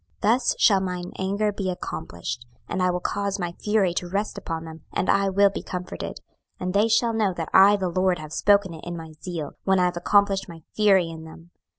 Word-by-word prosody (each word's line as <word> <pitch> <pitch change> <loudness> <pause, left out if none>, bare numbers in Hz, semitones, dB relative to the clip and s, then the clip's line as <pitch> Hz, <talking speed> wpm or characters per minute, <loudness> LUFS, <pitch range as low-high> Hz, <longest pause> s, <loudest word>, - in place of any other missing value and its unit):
26:005:013 215 - +5
Thus 255 - 0
shall 200 -4 +5
mine 180 -1 -4
anger 200 +3 0
be 195 -2 -3
accomplished, 120 - -5 0.2
and 185 - -2
I 180 - +3
will 180 0 0
cause 200 +1 -2
my 175 -3 -3
fury 200 0 +1
to 175 0 -3
rest 200 +3 -2
upon 165 -1 -5
them, 160 -1 -10
and 185 - +1
I 195 0 +2
will 200 +1 +4
be - - -5
comforted: 180 0 -6 0.4
and 180 0 -3
they 205 +2 +4
shall 230 +1 +2
know 210 -5 +1
that 165 -2 -4
I 200 +2 +7
the 190 -2 -1
LORD 185 +1 +1
have 155 0 -9
spoken 200 -2 +3
it 160 - -10
in 175 0 -5
my 160 -1 -9
zeal, 165 -5 -5
when 190 0 +3
I 180 - +4
have 180 -1 -1
accomplished 195 +1 +2
my 165 -2 -11
fury 195 -5 +4
in 160 -1 -8
them. 165 +2 -13
185 Hz, 225 wpm, -24 LUFS, 170-200 Hz, 0.4 s, I